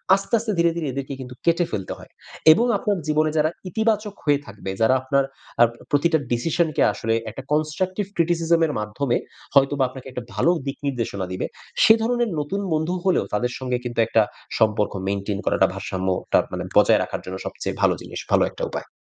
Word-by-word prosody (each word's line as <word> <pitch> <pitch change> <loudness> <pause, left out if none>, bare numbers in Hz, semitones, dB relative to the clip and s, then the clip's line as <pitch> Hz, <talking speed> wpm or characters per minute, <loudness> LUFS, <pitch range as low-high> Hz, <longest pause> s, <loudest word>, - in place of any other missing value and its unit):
আস্তে, 195 +3 -6
আস্তে 220 0 -2
ধীরে, 170 0 +4
ধীরে 160 -4 -2
এদেরকে 140 +1 -4
কিন্তু 125 -1 -8
কেটে 170 +1 +3
ফেলতে 95 -3 -3
হয়। - - -13 0.4
এবং 225 +9 +4
আপনার 200 0 0
জীবনে 155 0 +2
যারা 155 +1 +3 0.2
ইতিবাচক 215 +1 0
হয়ে 145 -2 +3
থাকবে, 105 -3 -8
যারা 110 +3 +5
আপনার 135 +1 +2 0.4
আপ 120 - +7 0.2
প্রতিটা 160 +3 +3
ডিসিশনকে 155 +6 +1
আসলে 115 0 -1 0.2
একটা 125 +5 -8
constructive 185 +6 0
criticism 170 0 +2
এর 150 - -3
মাধ্যমে 120 +4 -1 0.4
হয়তোবা 140 0 +4
আপনাকে 130 0 -10
১ 130 - -15
টা - - -8
ভালো 170 - +3
দিক 135 0 -4
নির্দেশনা 115 -7 -2
দিবে। 95 - -2 0.4
সে 220 - +9
ধরনের 240 0 +1
নতুন 170 +8 -2
বন্ধু 160 +3 0
হলেও 185 - +3
তাদের 125 +4 0
সঙ্গে 125 -1 -1
কিন্তু 120 -1 -3
একটা 115 - +4 0.4
সম্পর্ক 105 -1 +2
mantain 100 0 -2
করাটা - - +3
ভারসাম্য 95 0 -4 0.3
টা - - +7
মানে - - -3
বজায় - - +6
রাখার - - -5
জন্য 95 +1 -5
সবচেয়ে - - -4
ভালো - - +4
জিনিস, - - -7
ভালো - - +5
একটা - - -7
উপায়। - - -5
145 Hz, 185 wpm, -23 LUFS, 120-170 Hz, 0.4 s, সে